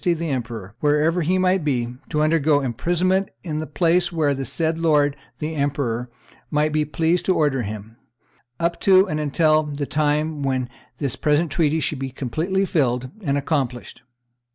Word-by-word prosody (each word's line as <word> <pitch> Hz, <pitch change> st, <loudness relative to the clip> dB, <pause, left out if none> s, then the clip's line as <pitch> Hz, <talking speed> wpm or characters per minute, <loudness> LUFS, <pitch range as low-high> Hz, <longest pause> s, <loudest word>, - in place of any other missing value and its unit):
the 170 Hz, -2 st, 0 dB
emperor, 115 Hz, -6 st, -4 dB
wherever 150 Hz, +4 st, +2 dB
he 180 Hz, +4 st, +1 dB
might 185 Hz, -1 st, +2 dB
be, 125 Hz, -4 st, -1 dB
to 150 Hz, -1 st, +1 dB
undergo 155 Hz, -2 st, +3 dB
imprisonment 175 Hz, -, 0 dB
in 155 Hz, -4 st, -3 dB
the 155 Hz, -, -4 dB
place 175 Hz, +2 st, +2 dB
where 155 Hz, -4 st, +1 dB
the 135 Hz, 0 st, -3 dB
said 160 Hz, +5 st, -1 dB
lord 150 Hz, -3 st, +3 dB, 0.2 s
the 155 Hz, +1 st, -4 dB
emperor 135 Hz, -5 st, -1 dB, 0.4 s
might 150 Hz, 0 st, +1 dB
be 155 Hz, 0 st, +2 dB
pleased 165 Hz, +3 st, 0 dB
to 185 Hz, -, +2 dB
order 145 Hz, -4 st, +1 dB
him, 110 Hz, +1 st, -7 dB, 0.6 s
up 170 Hz, 0 st, 0 dB
to 190 Hz, 0 st, +5 dB
and 155 Hz, -4 st, -2 dB
until 155 Hz, +1 st, +3 dB
the 145 Hz, -1 st, -4 dB
time 150 Hz, +1 st, 0 dB
when 130 Hz, -2 st, -1 dB, 0.3 s
this 140 Hz, -5 st, -2 dB
present 150 Hz, +1 st, +1 dB
treaty 160 Hz, +1 st, +1 dB
should 145 Hz, -1 st, -2 dB
be 135 Hz, 0 st, -3 dB
completely 160 Hz, +10 st, -1 dB
fulfilled 130 Hz, -8 st, 0 dB
and 140 Hz, -6 st, 0 dB
accomplished. 135 Hz, -5 st, -2 dB
150 Hz, 165 wpm, -22 LUFS, 135-165 Hz, 0.6 s, to